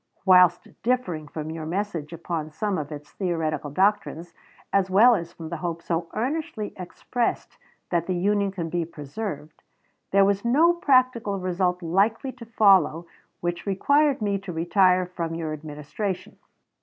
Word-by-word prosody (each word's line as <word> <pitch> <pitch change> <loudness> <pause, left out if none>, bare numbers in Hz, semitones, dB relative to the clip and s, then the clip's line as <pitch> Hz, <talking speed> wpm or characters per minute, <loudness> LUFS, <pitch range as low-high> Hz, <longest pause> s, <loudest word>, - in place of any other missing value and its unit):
Whilst 180 -2 +5
differing 190 -11 -1
from 155 +1 -6
your 160 -1 -6
message 170 -4 -3
upon 165 -2 -4
some 195 +4 -2
of 145 0 -6
its 150 0 -9
theoretical 160 -5 -2
doctrines, 175 -1 0 0.4
as 195 -1 +2
well 220 +6 +7
as 170 -5 -2
from 165 -2 -9
the 170 - -4
hope 170 +1 -4
so 165 0 -2
earnestly 250 -4 -3
expressed 215 +6 -3 0.4
that 170 -2 0
the 185 - 0
Union 200 +2 +1
can 175 -4 -4
be 170 +1 -1
preserved, 155 +1 -7 0.5
there 195 0 +5
was 200 0 +1
no 300 +9 +4
practical 255 - +2
result 180 -1 -1
likely 205 +10 +1
to 245 -3 -12
follow 190 -7 +4 0.4
which 175 +3 -3
required 285 +6 +2
me 200 -1 0
to 195 -1 -7
retire 180 +2 +3
from 170 -2 -4
your 160 -2 -3
Administration. 155 +6 -5
180 Hz, 150 wpm, -25 LUFS, 165-205 Hz, 0.5 s, well